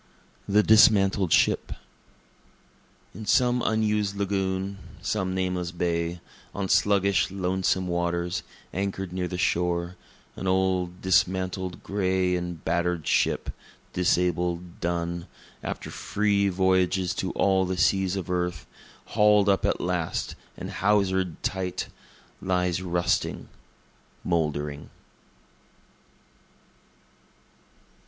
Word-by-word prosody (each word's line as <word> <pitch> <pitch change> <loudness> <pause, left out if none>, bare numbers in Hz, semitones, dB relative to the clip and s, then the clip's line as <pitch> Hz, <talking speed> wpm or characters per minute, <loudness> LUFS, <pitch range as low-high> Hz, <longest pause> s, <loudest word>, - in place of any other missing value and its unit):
The 105 +1 +5
Dismantled 100 -4 +5
Ship - - +3 1.4
In 110 -1 -8
some 125 +2 +3
unused 105 -2 +1
lagoon, 95 -1 -2 0.2
some 95 0 -2
nameless 90 -2 -1
bay, 85 -1 -2 0.3
On 100 -1 -2
sluggish, 100 0 +3
lonesome 95 0 0
waters, 85 0 -1 0.3
anchor'd 95 -1 -3
near 90 -1 -2
the 90 - -4
shore, 85 0 0 0.4
An 95 - -5
old, 95 -1 0
dismasted, 95 0 0
gray 95 -2 +1
and 90 -2 -5
batter'd 85 -2 0
ship, - - +1 0.4
disabled, 90 -1 0
done, 85 0 -2 0.3
After - - -5
free 100 -1 +1
voyages 95 -1 +2
to 95 - -2
all 95 -1 +2
the 95 0 -2
seas 95 0 +2
of 95 -4 -4
earth, 90 -2 -2 0.5
haul'd 105 -1 +5
up 100 - +2
at - - 0
last 90 -2 -2 0.2
and - - -6
hawser'd 95 -2 +1
tight, 95 -1 -2 0.5
Lies 90 -1 0
rusting, 90 -1 -1 0.7
mouldering. 75 -3 -2
95 Hz, 100 wpm, -26 LUFS, 90-95 Hz, 1.4 s, The